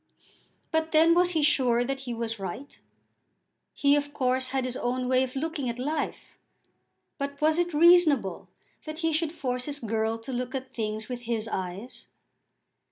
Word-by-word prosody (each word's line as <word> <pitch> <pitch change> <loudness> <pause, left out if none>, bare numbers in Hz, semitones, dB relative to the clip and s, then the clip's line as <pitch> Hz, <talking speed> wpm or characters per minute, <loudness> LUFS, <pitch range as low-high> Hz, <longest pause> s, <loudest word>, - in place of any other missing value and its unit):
But 320 0 0
then 325 +2 +6
was 355 +1 +3
he 315 -2 +1
sure 255 -5 +3
that 270 +2 -3
he - - -2
was 225 -1 -3
right? 195 +10 -7 0.9
He 280 0 +3
of 290 0 -2
course 255 0 +1
had 260 0 -1
his 250 -1 -3
own 250 +1 -1
way 255 0 +3
of 260 0 -2
looking 295 -2 -2
at 235 - -4
life, 290 +4 -4 0.8
but 280 0 -4
was 310 +2 +3
it 350 0 +1
reasonable 310 - +4 0.4
that 310 0 -6
he 325 - +2
should 315 0 0
force 250 -6 -3
his 290 -1 -2
girl 225 -1 -1
to 230 +3 -8
look 250 +1 -3
at 260 0 -5
things 215 -1 -3
with 245 -1 -5
his 225 -2 -1
eyes? 190 +3 -5
260 Hz, 170 wpm, -27 LUFS, 240-305 Hz, 0.9 s, then